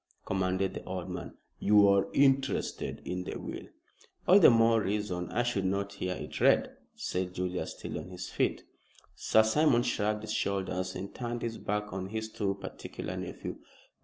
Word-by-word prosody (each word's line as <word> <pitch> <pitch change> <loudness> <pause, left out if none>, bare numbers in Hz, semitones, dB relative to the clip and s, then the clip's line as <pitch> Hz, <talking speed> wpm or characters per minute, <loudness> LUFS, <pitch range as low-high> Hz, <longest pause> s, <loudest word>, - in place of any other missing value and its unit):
commanded 95 0 0
the - - -6
old 90 -1 -4
man. - - -6 0.2
"You 105 0 +6
are 100 0 +4
interested 135 -1 +1
in 90 0 -3
the - - -5
will." - - -7 0.6
"All 190 +3 +8
the 180 - +9
more 115 -1 +5
reason 95 -4 -2
I 120 - +1
should 110 -5 0
not 100 +1 -1
hear 90 0 -3
it - - -6
read," - - +4 0.2
said 90 0 -3
Julius, 90 0 -3
still - - -5
on - - -8
his 90 0 -6
feet. - - 0 0.5
Sir 110 - +4
Simon 120 +2 +3
shrugged 105 -1 0
his 110 0 -3
shoulders 95 -2 -1
and 100 - -6
turned 120 -1 -4
his 115 -1 -3
back 105 -1 -2
on 95 0 -3
his 110 +1 -4
too 100 -3 -1
particular 100 - -7
nephew. - - -6
100 Hz, 170 wpm, -30 LUFS, 95-110 Hz, 0.6 s, the